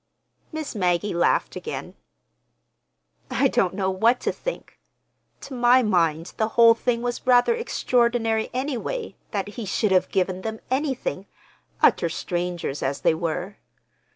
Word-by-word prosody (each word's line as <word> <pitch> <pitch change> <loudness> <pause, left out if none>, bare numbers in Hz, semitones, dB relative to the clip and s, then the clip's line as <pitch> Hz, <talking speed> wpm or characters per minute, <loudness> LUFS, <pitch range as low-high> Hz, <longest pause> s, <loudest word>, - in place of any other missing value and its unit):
Miss 315 -2 -5
Maggie 185 -1 0
laughed 175 - +1
again. - - -6 1.4
"I 275 - +2
don't 195 -8 +1
know 190 -1 0
what 230 +6 +3
to - - 0
think. - - -7 0.6
To 275 - -9
my 250 +1 +4
mind 170 -5 +1
the 220 - +1
whole 230 -1 +8
thing 235 +1 -1
was 245 +1 -4
rather 250 - +5
extraordinary, 235 - 0
anyway, 280 - -3
that 200 -2 -3
he 225 +1 -6
should 205 +2 0
have 185 -1 +3
given 185 -1 -1
them 220 +2 -5
anything—utter 265 - -1
strangers 175 -4 -3
as 135 +1 -2
they - - +3
were. 175 +4 -3
220 Hz, 130 wpm, -24 LUFS, 180-245 Hz, 1.4 s, whole